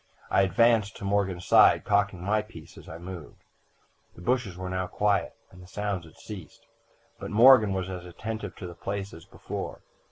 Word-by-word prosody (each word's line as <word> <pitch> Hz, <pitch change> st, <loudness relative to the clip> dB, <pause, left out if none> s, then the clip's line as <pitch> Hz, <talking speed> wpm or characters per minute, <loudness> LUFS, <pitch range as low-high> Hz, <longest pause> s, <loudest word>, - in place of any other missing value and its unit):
I -, -, +4 dB
advanced 105 Hz, +2 st, +3 dB
to -, -, -7 dB
Morgan's 100 Hz, -3 st, 0 dB
side, -, -, +6 dB
cocking 100 Hz, -3 st, +1 dB
my 105 Hz, +3 st, +1 dB
piece 95 Hz, -8 st, -13 dB
as -, -, -13 dB
I 80 Hz, -, -8 dB
moved. 85 Hz, -2 st, -10 dB, 0.7 s
"The 85 Hz, -, -12 dB
bushes 120 Hz, -6 st, -1 dB
were 95 Hz, 0 st, -5 dB
now 95 Hz, 0 st, -2 dB
quiet, 105 Hz, +1 st, 0 dB, 0.2 s
and 90 Hz, -, -14 dB
the 90 Hz, -, -14 dB
sounds 100 Hz, -2 st, -3 dB
had 80 Hz, -, -17 dB
ceased, 95 Hz, -8 st, -11 dB, 0.5 s
but -, -, -6 dB
Morgan 115 Hz, -1 st, +7 dB
was 95 Hz, -1 st, -2 dB
as 90 Hz, -2 st, -6 dB
attentive 105 Hz, +2 st, -6 dB
to -, -, -8 dB
the 85 Hz, -, -7 dB
place 100 Hz, +3 st, -5 dB
as 80 Hz, -, -12 dB
before. -, -, -7 dB
95 Hz, 185 wpm, -27 LUFS, 90-105 Hz, 0.7 s, Morgan